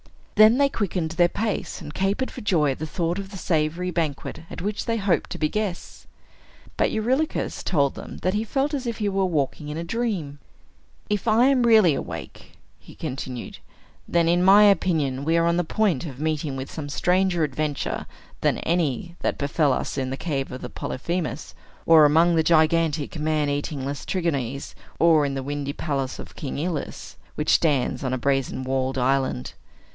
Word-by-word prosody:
Then 215 Hz, +3 st, +7 dB
they 280 Hz, 0 st, +4 dB
quickened 185 Hz, -9 st, -2 dB
their 175 Hz, +1 st, +3 dB
pace, 215 Hz, +3 st, -3 dB
and 150 Hz, -4 st, -9 dB
capered 200 Hz, +9 st, -1 dB
for -, -, -8 dB
joy 160 Hz, -8 st, +2 dB
at 130 Hz, -, -5 dB
the 155 Hz, -, -3 dB
thought 170 Hz, +3 st, -1 dB
of 195 Hz, -1 st, -6 dB
the 195 Hz, -, -8 dB
savory 170 Hz, +1 st, 0 dB
banquet 155 Hz, -5 st, -3 dB
at -, -, -7 dB
which 205 Hz, +2 st, -3 dB
they 230 Hz, 0 st, 0 dB
hoped 195 Hz, -4 st, 0 dB
to -, -, -5 dB
be 155 Hz, -, +1 dB
guests. 205 Hz, 0 st, -4 dB, 0.7 s
But -, -, +2 dB
Eurylochus 260 Hz, +8 st, -1 dB
told 140 Hz, -5 st, +1 dB
them -, -, -9 dB
that 185 Hz, -, +1 dB
he 210 Hz, +1 st, 0 dB
felt 270 Hz, +6 st, -1 dB
as 265 Hz, -4 st, -2 dB
if 235 Hz, -, -3 dB
he 210 Hz, -, -1 dB
were 195 Hz, -1 st, +1 dB
walking 150 Hz, -2 st, -1 dB
in 150 Hz, -, -4 dB
a 165 Hz, -, -3 dB
dream. 175 Hz, -8 st, -3 dB, 0.7 s
"If 210 Hz, +1 st, -2 dB
I 225 Hz, +3 st, +5 dB
am 270 Hz, -2 st, +4 dB
really 220 Hz, -8 st, +6 dB
awake," -, -, -7 dB, 0.4 s
continued 130 Hz, -5 st, -5 dB
he, -, -, -27 dB, 0.5 s
"then, 170 Hz, -1 st, +2 dB
in 175 Hz, +1 st, +3 dB
my 200 Hz, +3 st, +8 dB
opinion, 160 Hz, -9 st, +2 dB
we 165 Hz, +3 st, +2 dB
are 165 Hz, -, +3 dB
on 170 Hz, 0 st, +2 dB
the 175 Hz, -, +2 dB
point 175 Hz, -3 st, 0 dB
of 135 Hz, -3 st, -9 dB
meeting 155 Hz, -2 st, -1 dB
with 135 Hz, 0 st, -6 dB
some 145 Hz, -3 st, -6 dB
stranger 180 Hz, +2 st, +1 dB
adventure 150 Hz, 0 st, -2 dB, 0.3 s
than -, -, +1 dB
any 170 Hz, 0 st, -1 dB
that -, -, -1 dB
befell 145 Hz, +1 st, +1 dB
us 135 Hz, -, -2 dB
in 130 Hz, -1 st, -2 dB
the 135 Hz, -, -4 dB
cave 140 Hz, -5 st, -3 dB
of 130 Hz, -, -7 dB
Polyphemus, 160 Hz, +1 st, -4 dB, 0.3 s
or 160 Hz, -2 st, +7 dB
among 165 Hz, +4 st, +4 dB
the 165 Hz, -, +4 dB
gigantic 160 Hz, -1 st, +2 dB
man 150 Hz, -1 st, +1 dB
eating 145 Hz, -1 st, -3 dB
Laestrygons, 140 Hz, -3 st, -2 dB, 0.2 s
or 160 Hz, -3 st, +4 dB
in 135 Hz, -, -3 dB
the 135 Hz, -, -3 dB
windy 140 Hz, 0 st, -3 dB
palace 135 Hz, -4 st, -3 dB
of -, -, -10 dB
King 140 Hz, -, -5 dB
Aeolus, 160 Hz, -1 st, -4 dB, 0.2 s
which -, -, 0 dB
stands 140 Hz, -6 st, +2 dB
on 130 Hz, -1 st, -1 dB
a -, -, 0 dB
brazen 135 Hz, 0 st, 0 dB
walled 130 Hz, 0 st, -1 dB
island. 130 Hz, -, 0 dB
160 Hz, 185 wpm, -24 LUFS, 140-190 Hz, 0.7 s, my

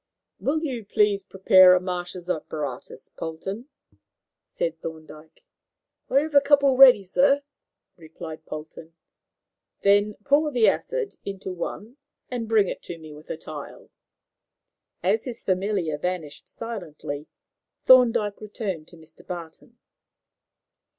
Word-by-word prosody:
"Will 310 Hz, +4 st, -1 dB
you 255 Hz, -7 st, -3 dB
please 205 Hz, -1 st, +2 dB
prepare 190 Hz, -1 st, +6 dB
a -, -, +3 dB
Marsh's 180 Hz, -1 st, -5 dB
apparatus, 150 Hz, -6 st, -5 dB
Polton," 190 Hz, -, -6 dB, 0.8 s
said 165 Hz, -1 st, -3 dB
Thorndyke. 160 Hz, -1 st, -10 dB, 0.6 s
"I 275 Hz, -, +4 dB
have 310 Hz, 0 st, -5 dB
a 285 Hz, -, +7 dB
couple 280 Hz, -1 st, +4 dB
ready, 255 Hz, -6 st, +8 dB
sir," 275 Hz, +9 st, +3 dB, 0.5 s
replied 160 Hz, -1 st, -10 dB
Polton. 160 Hz, +1 st, -9 dB, 0.9 s
"Then 205 Hz, +1 st, +3 dB
pour 290 Hz, +4 st, +3 dB
the 240 Hz, -5 st, +3 dB
acid 485 Hz, -5 st, -1 dB
into 195 Hz, -1 st, -6 dB
one 215 Hz, +7 st, -6 dB, 0.3 s
and 235 Hz, -3 st, -4 dB
bring 215 Hz, -3 st, +4 dB
it -, -, -5 dB
to 170 Hz, -, -8 dB
me, 155 Hz, -2 st, -11 dB
with 150 Hz, +1 st, -14 dB
a -, -, -4 dB
tile." 155 Hz, -3 st, -10 dB, 1.1 s
As 205 Hz, +5 st, +1 dB
his 245 Hz, -3 st, -7 dB
familiar 185 Hz, -5 st, -1 dB
vanished 175 Hz, -4 st, -4 dB
silently, 160 Hz, -10 st, -7 dB, 0.6 s
Thorndyke 225 Hz, -5 st, +4 dB
turned 185 Hz, -9 st, -4 dB
to 170 Hz, -, -16 dB
Mr. 160 Hz, 0 st, -14 dB
Barton. 170 Hz, -3 st, -9 dB
190 Hz, 120 wpm, -25 LUFS, 160-235 Hz, 1.1 s, ready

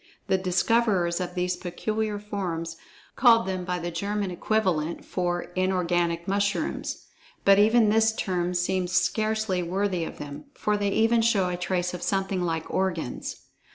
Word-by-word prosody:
The 190 Hz, -, +2 dB
discoverers 185 Hz, -1 st, +2 dB
of 180 Hz, 0 st, -4 dB
these 180 Hz, 0 st, 0 dB
peculiar 215 Hz, +4 st, -3 dB
forms, 180 Hz, -6 st, -4 dB, 0.4 s
called 230 Hz, -2 st, +5 dB
them 185 Hz, -1 st, -2 dB
by 180 Hz, 0 st, -2 dB
the 175 Hz, 0 st, -4 dB
German 200 Hz, +3 st, -2 dB
equivalent 175 Hz, -4 st, 0 dB
for 175 Hz, -1 st, -1 dB
"inorganic 175 Hz, -2 st, 0 dB
mushrooms," 200 Hz, +1 st, -1 dB, 0.4 s
but 195 Hz, 0 st, +7 dB
even 220 Hz, +1 st, +5 dB
this 220 Hz, +1 st, +4 dB
term 180 Hz, -4 st, -2 dB
seems 180 Hz, 0 st, 0 dB
scarcely 215 Hz, +1 st, +1 dB
worthy 185 Hz, 0 st, -1 dB
of -, -, -6 dB
them, 145 Hz, 0 st, -8 dB
for 210 Hz, -, 0 dB
they 205 Hz, -1 st, 0 dB
even 225 Hz, +3 st, +3 dB
show 205 Hz, -5 st, +2 dB
a 180 Hz, -, -2 dB
trace 180 Hz, 0 st, -1 dB
of 180 Hz, -, -5 dB
something 195 Hz, -1 st, -1 dB
like 165 Hz, -2 st, -2 dB
organs. 175 Hz, -9 st, -2 dB
185 Hz, 150 wpm, -26 LUFS, 175-205 Hz, 0.4 s, but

